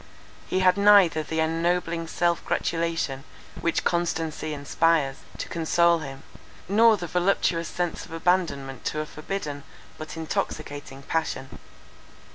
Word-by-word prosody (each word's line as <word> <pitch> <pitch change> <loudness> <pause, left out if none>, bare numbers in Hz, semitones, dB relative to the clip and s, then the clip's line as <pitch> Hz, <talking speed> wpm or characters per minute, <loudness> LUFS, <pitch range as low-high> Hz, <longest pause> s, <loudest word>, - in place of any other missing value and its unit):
He 185 - 0
had 185 0 +4
neither 200 -6 +6
the 160 +1 -2
ennobling 165 +1 0
self 170 +1 0
gratulation, 165 -5 -1 0.4
which 170 - 0
constancy 165 -2 -1
inspires, 145 -1 +1 0.2
to - - -4
console 170 +1 +3
him, 135 -3 -8 0.4
nor 220 +3 +5
the 175 - -5
voluptuous 175 -1 +1
sense 175 -2 -3
of - - -17
abandonment 165 -7 0
to 155 - -1
a - - -4
forbidden, 155 -2 -5 0.4
but 155 +1 -7
intoxicating 145 -3 -4
passion. 140 -4 -3
165 Hz, 120 wpm, -26 LUFS, 155-175 Hz, 0.4 s, neither